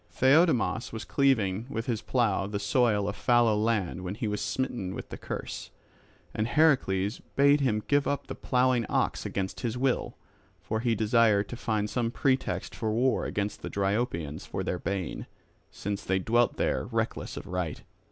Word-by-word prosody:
Theiodamas 135 -3 +3
was 110 - -6
cleaving 115 -6 +1
with 115 -4 -3
his 115 -3 -1
plough 110 -4 +1
the 105 0 -3
soil 105 0 +2
of 105 - -2
fallow 120 -3 +3
land 105 -4 0
when 90 +2 -4
he 110 - -3
was 105 0 -2
smitten 120 -8 -2
with - - -7
the - - -6
curse; - - -6 0.6
and 110 +1 -1
Heracles 115 -9 +2 0.2
bade 140 +1 +5
him 110 -6 +1
give 145 0 +2
up 145 - -1
the - - -6
ploughing 125 -1 +2
ox - - 0
against 95 -1 -3
his 120 0 -2
will. 130 0 0 0.4
For 110 - -3
he 115 0 +1
desired 110 -2 +3
to - - -5
find 110 -4 -1
some 115 +1 -1
pretext 130 +2 0
for 110 -2 -2
war 125 +4 +1
against 105 0 -3
the - - -5
Dryopians 95 - -1
for - - -4
their 90 - -2
bane, 95 -4 -3 0.4
since 100 0 -4
they 95 - +1
dwelt 115 +5 +2
there - - 0
reckless - - -3
of - - -6
right. 90 -5 -3
110 Hz, 170 wpm, -28 LUFS, 100-125 Hz, 0.6 s, bade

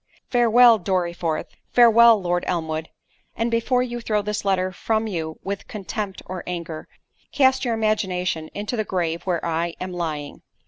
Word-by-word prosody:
"Farewell 240 -1 +6
Dorriforth—farewell 195 +6 +3
Lord 175 -1 -1
Elmwood—and 160 +7 -4
before 245 +2 +1
you 240 -1 -5
throw 210 -2 0
this 210 +1 -3
letter 185 -2 +1
from 220 +3 -1
you 160 -6 -4
with 200 0 -5
contempt 200 -1 -5
or 185 -1 -6
anger, 170 -3 -5 0.4
cast 265 -1 +3
your 235 -3 0
imagination 185 -7 -1
into 210 +4 -3
the 215 - 0
grave 170 -4 -2
where 175 -3 -1
I 170 0 -1
am 185 0 -5
lying. 155 -4 -4
190 Hz, 140 wpm, -23 LUFS, 170-225 Hz, 0.4 s, Farewell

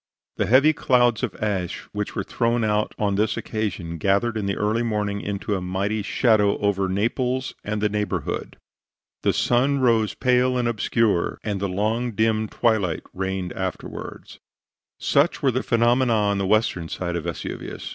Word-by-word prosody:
The - - 0
heavy 140 +6 +5
clouds 120 -5 +2
of - - -2
ashes 95 -5 -3
which 105 0 -4
were 100 - -1
thrown 115 +3 0
out 105 0 0
on 105 -2 0
this 105 +2 +1
occasion 90 -7 -3
gathered 100 +6 +1
in 105 -2 -2
the 100 - -1
early 105 +3 +1
morning 105 -3 -1
into 100 +1 -3
a 95 - -1
mighty 100 +4 -1
shadow 105 -1 +2
over 100 -2 0
Naples 125 +6 -1
and 105 0 -3
the - - +4
neighborhood; 105 0 -3 0.6
the - - +3
sun 130 +4 +2
rose 115 -5 +2
pale 125 0 +2
and 120 -1 +1
obscure, 110 -4 +1
and 100 -3 -2
a 100 - 0
long, 110 +5 -1
dim 110 +1 +1
twilight 105 -8 0
reigned 95 -1 -3
afterward. 95 -1 -6 0.6
Such 145 +2 +1
were 135 - +4
the 130 +2 -1
phenomena 120 +1 +2
on 100 -2 +1
the 95 - 0
western 95 -6 +1
side 85 -1 -3
of 85 -1 -3
Vesuvius. 85 - -5
105 Hz, 165 wpm, -23 LUFS, 100-120 Hz, 0.6 s, heavy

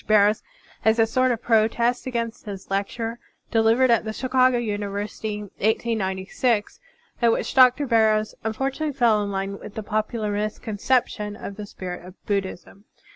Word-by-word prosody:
Barrows 210 0 +4 0.4
as 220 +1 +4
a 225 - +5
sort 255 +3 +2
of 235 -1 -3
protest 235 +2 +2
against 230 -3 -3
his 195 -1 -8
lecture 225 +4 -2 0.3
delivered 230 +3 +4
at 230 - +4
the 220 0 -4
Chicago 255 0 +3
Uni 210 -3 -2
versity, 210 +1 -4
1896, 210 +1 -1 0.4
in 235 -1 +5
which - - -1
Dr. 255 +2 +6
Barrows 220 -3 +3
unfortunately 270 +7 -2
fell 235 -5 +3
in 200 - -3
line 195 0 -3
with 210 - -10
the 220 - -4
popular 215 +1 -2
misconception 210 +1 -1
of 200 -2 -7
the 210 0 -7
spirit 180 -3 -7
of 180 +1 -12
Buddhism. 195 0 -3
220 Hz, 150 wpm, -24 LUFS, 205-235 Hz, 0.4 s, Dr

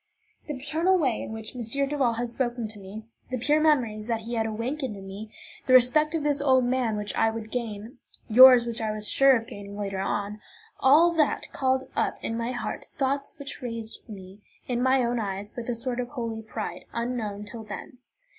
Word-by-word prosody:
The 295 - -3
paternal 320 +7 +1
way 265 -9 0
in - - -6
which 220 +2 -7
M. 250 - -5
Duval 275 +1 0
had 235 +1 -3
spoken 240 -2 -2
to 210 -1 -6
me; 200 +3 -9 0.2
the 255 - -2
pure 295 +6 +2
memories 235 -9 +2
that 230 -2 -1
he 235 +2 -5
awakened 230 +2 -2
in 195 - -10
me; 200 +3 -8 0.4
the 255 - +6
respect 300 +6 +5
of 315 - -1
this 290 -1 +1
old 260 -3 +4
man, 245 -3 0
which 210 0 -2
I 225 - +3
would 220 -1 -6
gain; 230 +1 -5 0.3
yours, 250 +1 +9
which 235 -1 -2
I 220 - -1
was 215 0 -2
sure 270 -1 +5
of 225 -2 -2
gaining 205 -4 -9
later 195 -2 -3
on: 205 +2 -2 0.4
all 310 +6 +6
that 315 -4 0
called 260 -1 +1
up - - 0
in 225 - -2
my 235 +1 -2
heart 245 - -5
thoughts 275 0 -1
which 280 0 -6
raised 230 -2 -5
me 195 -1 -11 0.3
in 245 -1 -1
my 260 0 +3
own 240 0 0
eyes 200 0 -4
with 240 0 -5
a 240 - 0
sort 245 +1 -3
of 245 -1 -3
holy 230 -5 -4
pride, 220 0 -6
unknown 230 -4 -3
till 225 +1 -8
then. 240 +3 -9
235 Hz, 200 wpm, -26 LUFS, 215-260 Hz, 0.4 s, yours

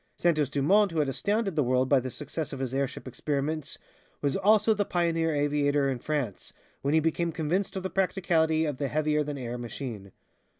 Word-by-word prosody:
Santos 155 -5 +2
Dumont, 185 +9 +3
who 165 - -4
had 150 -3 +2
astounded 200 - -1
the 150 - +3
world 130 0 +2
by 140 0 +4
the 130 +1 -4
success 150 +3 -5
of - - -6
his 130 -1 -3
airship 135 -1 -2
experiments, 145 +3 -2 0.4
was 140 -2 0
also 215 +2 +4
the 205 -1 +1
pioneer 165 -3 0
aviator 145 -1 +2
in 130 - -3
France, 140 -8 -3 0.3
when 140 +3 +1
he - - +6
became 165 +2 0
convinced 170 +6 -1
of 190 - -3
the 190 - -2
practicality 165 -4 +1
of 145 -4 -2
the 140 0 -1
heavier 150 +1 +1
than 145 -1 -5
air 125 -1 -5
machine. 115 -5 -6
150 Hz, 195 wpm, -28 LUFS, 135-170 Hz, 0.4 s, he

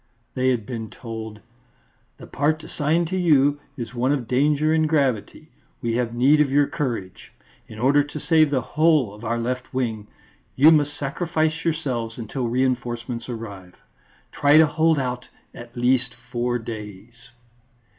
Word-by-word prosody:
They 130 0 +1
had 120 -5 0
been 115 -3 -6
told: 110 -3 -8 0.8
"The - - -11
part 155 +3 -1
assigned 160 +3 0
to 185 - -2
you 145 -5 +3 0.2
is 120 -1 -6
one 125 +2 0
of 135 -5 -1
danger 150 +4 +2
and 155 -1 +2
gravity; 135 -9 -1 0.3
we 115 -1 -2
have 120 -1 -1
need 140 +5 +4
of 145 - +2
your 145 +1 +4
courage. 115 -11 -5 0.4
In 110 - -11
order 140 +5 +3
to 145 +1 -8
save 155 -1 +3
the 135 -3 0
whole 150 -9 +2
of 105 +2 -13
our 115 +1 -1
left 125 +2 -3
wing 110 -5 -2 0.5
you 150 +5 +7
must 145 -2 +2
sacrifice 160 +2 -1
yourselves 130 -9 -2
until 120 +2 -4
reinforcements 120 -1 -2
arrive. 100 -6 -8 0.6
_Try 145 +1 +4
to 160 - +8
hold 160 +1 +2
out 125 -2 -3 0.3
at 120 0 -12
least 125 +1 +2 0.2
four 120 0 0
days. 110 +1 -9
130 Hz, 155 wpm, -23 LUFS, 115-150 Hz, 0.8 s, to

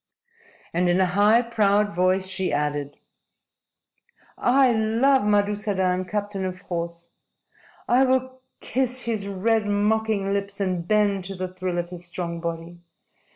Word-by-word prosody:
And 175 +1 +1
in 175 +1 +2
a 190 - +4
high, 205 +6 +4
proud 210 -3 +1
voice 185 +1 +2
she 190 0 -2
added: 145 -1 -2 1.4
"I 260 0 +3
love 230 +5 +3
Madusadan, 205 -3 +1
captain 205 0 -3
of 185 -1 -4
horse. 170 -2 -5 0.8
I 250 +2 +4
will 260 0 -1 0.2
kiss 255 0 -1
his 220 -4 -2
red, 210 +2 0
mocking 205 -1 0
lips 200 0 -3
and 185 -3 -2
bend 205 -3 +2
to 195 +1 -4
the 185 0 -5
thrill 185 -1 -3
of 175 0 -3
his 175 -1 -8
strong 175 -1 -5
body. 170 +1 -6
200 Hz, 135 wpm, -24 LUFS, 180-220 Hz, 1.4 s, a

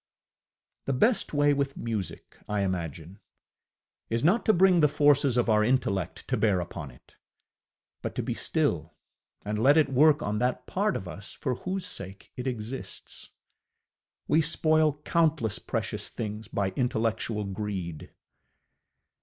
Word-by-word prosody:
The 135 - 0
best 210 - +2
way 145 -1 +3
with 140 -1 -1
music, 110 -6 -5
I 105 -1 0
imagine, 85 -1 -4 0.9
is 115 +2 0
not 195 +11 +3
to - - +8
bring 185 -1 +5
the 150 - +6
forces 145 -3 +3
of 120 - +2
our 105 -1 +4
intellect 105 -7 0
to - - +1
bear 105 -5 +2
upon 80 -4 -6
it, 60 - -20 0.8
but - - -5
to - - -1
be - - -2
still - - -1 0.5
and 105 +1 -2
let 140 +5 +6
it 155 -3 +4
work 145 +3 +4
on 105 +1 -1
that 125 0 0
part 205 +2 0
of 95 - -4
us 100 +4 -8
for 130 - -2
whose 185 +7 -4
sake 95 - -7
it 125 +1 -4
exists. 120 +1 -6 1.0
We 155 - +4
spoil 155 -1 +2
countless 155 -10 +1
precious - - -3
things 105 -1 -5
by 100 -2 -1
intellectual 110 -2 -1
greed. 95 -5 -5
120 Hz, 145 wpm, -28 LUFS, 105-150 Hz, 1.0 s, to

